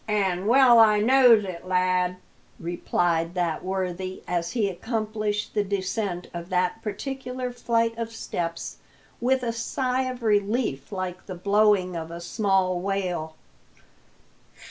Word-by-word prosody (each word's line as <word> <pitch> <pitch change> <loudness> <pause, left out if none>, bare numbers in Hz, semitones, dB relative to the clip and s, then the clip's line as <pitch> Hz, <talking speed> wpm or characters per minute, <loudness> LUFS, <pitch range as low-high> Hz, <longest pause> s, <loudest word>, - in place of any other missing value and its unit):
"An' 195 -3 0
well 245 -1 +7
I 215 -2 +6
knows 240 -1 +6
it, 185 -1 -7
lad!" 180 0 +1 0.4
replied 170 0 -1
that 175 -3 -1
worthy, 185 0 -3
as 170 +1 -2
he 225 -5 +1
accomplished 215 +1 -2
the 210 - +1
descent 195 -2 -2
of 170 +1 -6
that 180 +4 0
particular 250 +2 -4
flight 230 -1 0
of 230 0 -3
steps 170 -6 -4 0.4
with 255 +1 +1
a 230 -1 -1
sigh 255 +3 -1
of 250 -1 -7
relief 205 - 0
like 185 -2 -5
the 185 - -5
blowing 200 -1 +2
of 165 -1 -5
a 170 0 -7
small 185 0 +1
whale. 180 -4 -2
200 Hz, 130 wpm, -25 LUFS, 180-230 Hz, 0.4 s, well